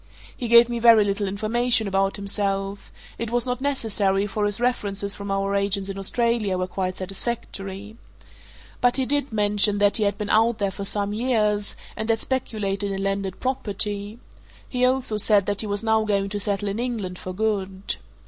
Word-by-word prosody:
He 245 - -4
gave 235 0 +7
me 240 -1 -3
very 230 -2 +7
little 200 0 -1
information 220 +3 +1
about 195 0 +1
himself: 200 -1 -2 0.3
it 230 - -3
was 240 +1 0
not 250 0 -3
necessary, 210 -8 +1
for 205 0 -1
his 205 +1 0
references 205 -5 0
from 200 0 -7
our 195 0 0
agents 200 0 0
in 195 0 -5
Australia 225 -1 +1
were 185 - -1
quite 185 0 -3
satisfactory. 195 +1 -5 0.8
But 245 +1 +3
he 265 - +1
did 285 0 0
mention 205 -1 +2
that 205 0 +4
he 215 - +1
had 200 0 0
been 210 -2 -3
out 225 +1 +3
there 200 -2 -1
for 200 +1 -6
some 205 0 0
years, 210 -3 0 0.2
and 220 +1 -3
had 225 -1 +2
speculated 205 -6 -2
in 195 0 -3
landed 195 -1 -2
property 210 -4 -2 0.5
he 250 -1 +1
also 255 -4 +1
said 205 -2 +4
that 205 -1 0
he 215 - -2
was 205 +1 -1
now 220 -1 +2
going 200 -2 0
to 205 +1 -3
settle 205 0 -1
in 200 +3 -3
England 220 -7 -3
for 185 - -6
good. 195 -1 -2
205 Hz, 185 wpm, -24 LUFS, 195-230 Hz, 0.8 s, gave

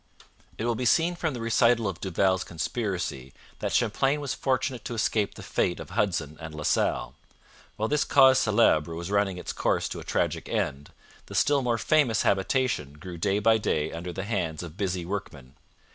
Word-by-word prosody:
It 110 - -3
will 120 - +1
be 125 - -3
seen 165 +8 +3
from 160 -5 -2
the 120 - -5
recital 115 0 +3
of 90 -3 -5
Duval's 95 0 +1
conspiracy 85 - -3 0.3
that - - -2
Champlain 135 +6 +1
was 140 -3 -3
fortunate 130 -1 -1
to 120 - -4
escape 105 -1 0
the - - -10
fate - - -1
of - - -9
Hudson 80 -7 -1
and 80 -1 -7
La 75 - -6
Salle. - - 0 0.6
While 110 - -1
this 150 +4 +2
cause 130 -1 +6
celebre 85 -8 +3
was 85 +3 -5
running 100 -2 +1
its - - -5
course - - 0
to - - -5
a - - -8
tragic - - -1
end, 70 +2 -2 0.4
the - - -8
still 145 -1 +3
more 120 -2 0
famous 125 -2 +2
habitation 95 - 0
grew 85 +3 -9
day 100 +3 +1
by 110 +2 +4
day 75 -7 -1
under 85 +2 -5
the 95 +2 -5
hands 90 -7 -2
of 85 -2 -9
busy 90 -3 -2
workmen. 75 -9 -6
100 Hz, 190 wpm, -27 LUFS, 85-120 Hz, 0.6 s, cause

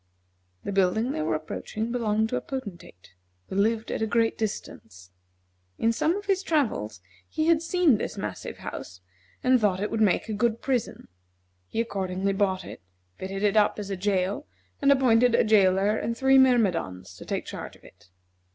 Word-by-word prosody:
The - - -4
building 195 +6 +1
they 155 - -2
were 155 0 0
approaching 215 +8 -4
belonged 220 -2 0
to 250 - -2
a - - -1
Potentate, 200 - -8 0.4
who - - -5
lived 220 +3 +1
at - - -3
a 220 - +1
great 225 +1 +1
distance. 95 - -6 0.7
In 225 - +2
some 315 +9 +1
of 405 0 -6
his 390 -2 +1
travels 220 - -1 0.3
he 310 - -1
had 330 -1 +4
seen 335 - +3
this - - -4
massive 105 -3 -5
house, 90 0 -8 0.4
and 255 -1 +4
thought 195 -3 +2
it 210 - -2
would 225 - -1
make 200 -4 +2
a 220 - -3
good 225 +2 0
prison. 255 -4 -2 0.6
He - - -4
accordingly 195 -3 -1
bought 190 -2 0
it, - - -10 0.4
fitted 195 +1 -4
it 205 0 +2
up 210 -1 +3
as 205 -1 -5
a - - -1
jail, 195 +6 -1 0.3
and 280 0 +5
appointed 245 -3 +4
a - - +4
jailer 200 -1 +3
and 230 +1 -3
three 265 +1 +5
myrmidons 175 - +1
to - - -10
take - - -3
charge - - -7
of - - -22
it. 90 0 -19
215 Hz, 180 wpm, -26 LUFS, 185-245 Hz, 0.7 s, and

